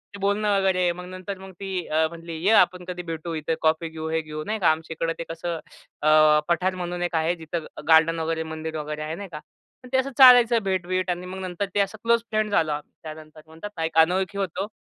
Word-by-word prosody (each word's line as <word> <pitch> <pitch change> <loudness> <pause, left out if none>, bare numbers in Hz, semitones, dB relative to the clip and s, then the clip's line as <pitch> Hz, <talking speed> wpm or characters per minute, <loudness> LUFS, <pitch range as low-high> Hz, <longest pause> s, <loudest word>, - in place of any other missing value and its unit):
ते - - -9
बोलणं 205 +1 +1
वगैरे. 185 -2 +2
मग 180 +1 -8
नंतर 185 +2 -7
मग 190 0 -10
ती 190 -3 -4
अ, 160 +1 +2
म्हणली, 165 0 -9
“ये, 200 - +4
आपण 180 -3 +3
कधी 180 -1 -5
भेटू, 165 0 -5
इथं 155 +1 -2
कॉफी 160 +1 +1
घेऊ, 160 0 -6
हे 160 0 0
घेऊ.” 155 0 -7
नाही 215 +1 -2
का, 175 - +4
आमच्या 160 +1 -4
इकडे 165 0 0
ते - - -2
कसं, 165 0 -4 0.4
अ, 155 0 +5
पठार 185 +2 +1
म्हणून 175 -1 -4
एक 175 -1 -2
आहे, 160 +2 +1
जिथं 165 -1 -5 0.2
गार्डन 165 +1 +5
वगैरे, 160 0 -1
मंदिर 160 0 -5
वगैरे 150 0 -5
आहे, 155 +1 -4
नाही 200 +1 -8
का. 150 - -6 0.5
मग - - -12
ते - - +4
असं 265 +1 0
चालायचं 245 -3 +8
भेट-बीट. 185 -1 -1
आणि 180 0 -2
मग 185 +1 -7
नंतर 185 +1 -3
ते - - +2
असं 200 +2 0
क्लोज 235 0 +3
फ्रेंड 215 -1 0
झालो 160 -6 +2
आम्ही 145 0 -5
त्यानंतर 155 0 -10
म्हणतात 160 +6 -9
ना, 165 - -2
एक 160 0 -4
अनोळखी 185 +4 +3
होतो. 195 0 -2
175 Hz, 230 wpm, -24 LUFS, 160-190 Hz, 0.5 s, चालायचं